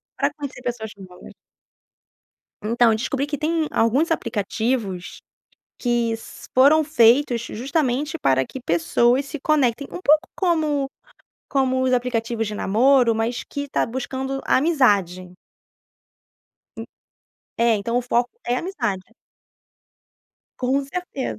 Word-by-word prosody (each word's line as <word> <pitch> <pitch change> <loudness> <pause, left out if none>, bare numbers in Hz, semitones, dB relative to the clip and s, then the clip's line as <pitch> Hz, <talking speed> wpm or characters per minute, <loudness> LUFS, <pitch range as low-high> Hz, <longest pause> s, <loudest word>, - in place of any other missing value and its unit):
para - - 0
conhecer 285 -4 -7
pessoas 240 -3 -4
novas. 185 -2 -13 1.3
Então, 230 +1 +3
descobri 260 +5 -2
que 290 0 -4
tem 320 +1 0
alguns 260 +9 +2
aplicativos, 220 - -2 0.6
que 240 -2 0
s 230 +1 -10
foram 285 +5 +6
feitos 245 -3 +4
justamente 275 +5 -2
para 130 -1 +2
que 265 - -8
pessoas 240 - +2
se 290 +1 -7
conectem, 275 -3 +1
um - - -6
pouco 305 -2 +4
como 310 -6 +1 0.6
como 260 -1 +1
os 260 - +1
aplicativos 235 -2 -1
de 210 - -5
namoro, 240 +4 +3
mas 225 +2 -2
que 285 0 -6
tá - - 0
buscando 265 +2 -4
amizade. 205 - +2 1.5
En - - -5 0.9
é, 225 - +4
então 230 +4 -1
o - - +1
foco 240 +1 +2
é 245 - 0
amizade. 235 - -3 1.6
Com 265 +2 0
certeza. 275 - -5
250 Hz, 120 wpm, -22 LUFS, 225-280 Hz, 1.6 s, foram